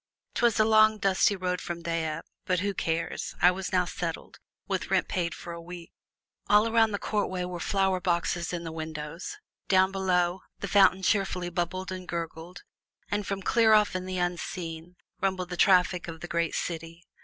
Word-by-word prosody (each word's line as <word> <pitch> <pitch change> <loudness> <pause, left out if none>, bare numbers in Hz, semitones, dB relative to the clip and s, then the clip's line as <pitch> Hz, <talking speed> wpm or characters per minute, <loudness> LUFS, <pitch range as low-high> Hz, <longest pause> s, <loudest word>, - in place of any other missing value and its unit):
'Twas 235 -3 +2
a 215 - +5
long, 215 0 +5
dusty 195 0 +3
ride 180 -1 -2
from 170 -1 -5
Dieppe, 165 -1 -2 0.2
but 180 -1 +1
who 200 0 -1
cares 165 -2 -2
I 180 - +6
was 190 +1 -5
now 180 -2 +3
settled, 170 -1 -5 0.3
with - - -2
rent - - +2
paid 170 -3 -2
for 170 - -8
a 170 - -8
week! 175 0 -10 0.6
All 210 +2 +5
around 225 -1 +4
the 205 - -2
courtway 200 -4 -1
were 180 -1 -5
flower 190 +1 +1
boxes 170 -1 0
in 175 -1 -4
the 165 - -5
windows; 160 - -6 0.3
down 190 0 +4
below, 180 -1 +1 0.2
the 200 - -4
fountain 190 0 +5
cheerfully 185 -3 0
bubbled 185 +2 -2
and 185 -1 -6
gurgled, 170 +1 -6 0.5
and 205 -1 -1
from 195 -1 -3
clear 225 +1 +4
off 210 -3 +4
in 185 0 -3
the 185 0 -3
unseen 175 -1 -4 0.3
rumbled 185 -2 -1
the 180 - -4
traffic 180 -1 +3
of 165 -1 -8
the 175 - -6
great 170 -1 -1
city. 165 0 -4
180 Hz, 180 wpm, -28 LUFS, 170-195 Hz, 0.6 s, I